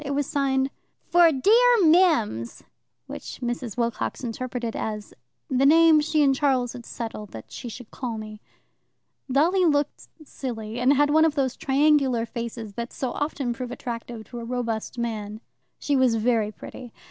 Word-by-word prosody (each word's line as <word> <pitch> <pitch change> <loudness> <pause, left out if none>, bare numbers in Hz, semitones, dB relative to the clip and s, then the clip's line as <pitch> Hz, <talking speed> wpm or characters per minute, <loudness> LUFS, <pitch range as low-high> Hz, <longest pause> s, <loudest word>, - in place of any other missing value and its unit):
It 280 -1 -3
was 290 0 0
signed 270 -1 0 0.4
"For 345 -1 +6
dear 445 - +4
Mims," 310 - +2 0.4
which - - -8
Mrs. 240 -2 -4
Wilcox 235 +2 -2
interpreted 240 0 -4
as 210 -1 -4 0.3
"the 265 -3 +1
name 320 +2 +6
she 305 0 +2
and 275 -1 +4
Charles 260 -3 +1
had 240 -2 -10
settled 220 -3 -6
that 110 - -10
she 245 - -7
should 235 0 -10
call 240 -4 -4
me." 215 0 -8 0.9
Dolly 340 +8 +3
looked 290 -3 0 0.2
silly, 230 -5 -6
and 255 +3 +4
had 290 +1 +3
one 315 +1 +5
of 320 -2 +2
those 265 -3 0
triangular 275 -4 +2
faces 230 -2 -6
that 235 +3 -5
so 260 - -3
often 280 -4 -2
prove 250 +1 -6
attractive 235 -2 -6
to 240 +2 -9
a - - -6
robust 230 -1 -3
man. 215 -3 -4 0.4
She 290 - -1
was 260 -3 +3
very 225 -1 +1
pretty. 245 +2 -10
250 Hz, 160 wpm, -25 LUFS, 230-290 Hz, 0.9 s, For